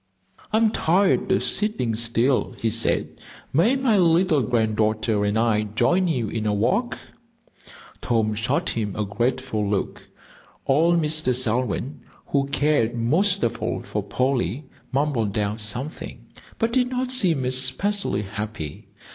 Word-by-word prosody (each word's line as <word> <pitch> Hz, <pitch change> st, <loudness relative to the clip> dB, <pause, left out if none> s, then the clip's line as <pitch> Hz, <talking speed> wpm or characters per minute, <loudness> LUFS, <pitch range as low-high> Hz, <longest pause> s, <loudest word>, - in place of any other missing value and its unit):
"I 215 Hz, -, +3 dB
am 220 Hz, -1 st, +3 dB
tired 190 Hz, 0 st, +2 dB
of 190 Hz, -, +2 dB
sitting 210 Hz, -, 0 dB
still," 120 Hz, +3 st, 0 dB
he 115 Hz, -, 0 dB
said. 115 Hz, +1 st, 0 dB, 0.3 s
"May 190 Hz, -, +3 dB
my 250 Hz, -6 st, +2 dB
little 170 Hz, -3 st, +3 dB
granddaughter 110 Hz, -2 st, 0 dB
and 105 Hz, +1 st, 0 dB
I 110 Hz, -2 st, +2 dB
join 180 Hz, +9 st, +2 dB
you 125 Hz, -9 st, -1 dB
in 110 Hz, +1 st, -3 dB
a 105 Hz, -, +1 dB
walk?" 200 Hz, -, 0 dB, 1.0 s
Tom 110 Hz, -3 st, 0 dB
shot 110 Hz, +2 st, -1 dB
him 105 Hz, -4 st, -3 dB
a 105 Hz, -, -2 dB
grateful 120 Hz, 0 st, -2 dB
look. 100 Hz, -2 st, -3 dB, 0.6 s
Old 165 Hz, +5 st, +3 dB
Mr. 155 Hz, -5 st, +1 dB
Selwyn, 125 Hz, +2 st, -1 dB, 0.2 s
who 140 Hz, -1 st, 0 dB
cared 140 Hz, -5 st, +1 dB
most 180 Hz, -, +1 dB
of 115 Hz, +1 st, -1 dB
all -, -, -2 dB
for -, -, -3 dB
Polly, 130 Hz, -, -1 dB, 0.3 s
mumbled 130 Hz, -8 st, 0 dB
out 105 Hz, +1 st, -1 dB
something, 120 Hz, +8 st, -4 dB, 0.3 s
but 230 Hz, 0 st, -1 dB
did 250 Hz, -1 st, +2 dB
not 255 Hz, 0 st, -2 dB
seem 175 Hz, -, +2 dB
especially 130 Hz, -, 0 dB
happy. 105 Hz, -6 st, -6 dB
130 Hz, 140 wpm, -23 LUFS, 110-170 Hz, 1.0 s, I